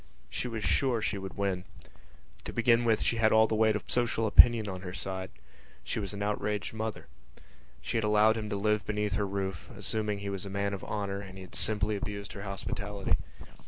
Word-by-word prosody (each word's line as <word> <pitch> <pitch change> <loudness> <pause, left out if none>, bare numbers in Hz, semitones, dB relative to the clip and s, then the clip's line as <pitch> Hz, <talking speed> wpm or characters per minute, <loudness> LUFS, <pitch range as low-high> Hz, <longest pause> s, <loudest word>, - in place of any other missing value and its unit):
She - - -2
was 110 -3 -4
sure 130 -4 +2
she 105 -1 -1
would 95 0 -7
win. 95 -2 -1 0.8
To - - -4
begin 120 0 +3
with 110 -2 +3
she 115 - +1
had 110 -1 +4
all 110 0 +6
the 110 - -2
weight 110 0 +3
of 105 - -3
social 120 -2 +1
opinion 110 0 +7
on 95 -2 -5
her 90 0 -6
side: 95 -1 -4 0.5
she - - -2
was 100 -2 -3
an 100 0 -4
outraged 105 0 -2
mother. 110 0 -4 0.8
She 90 - -1
had 110 - 0
allowed 105 +1 +4
him 110 -2 -4
to 100 - -2
live 105 +1 +1
beneath 105 -1 -1
her 100 - 0
roof, 95 -4 -4
assuming 105 -2 -1
that - - -9
he 100 - -3
was 100 -2 -3
a 100 - -5
man 100 +1 -1
of 95 - -5
honour, 100 -1 -3
and 95 -1 -9
he 95 - -8
had 90 - -14
simply 105 -1 +2
abused 100 0 -5
her 100 - -7
hospitality. 100 -1 -3
105 Hz, 215 wpm, -30 LUFS, 100-110 Hz, 0.8 s, opinion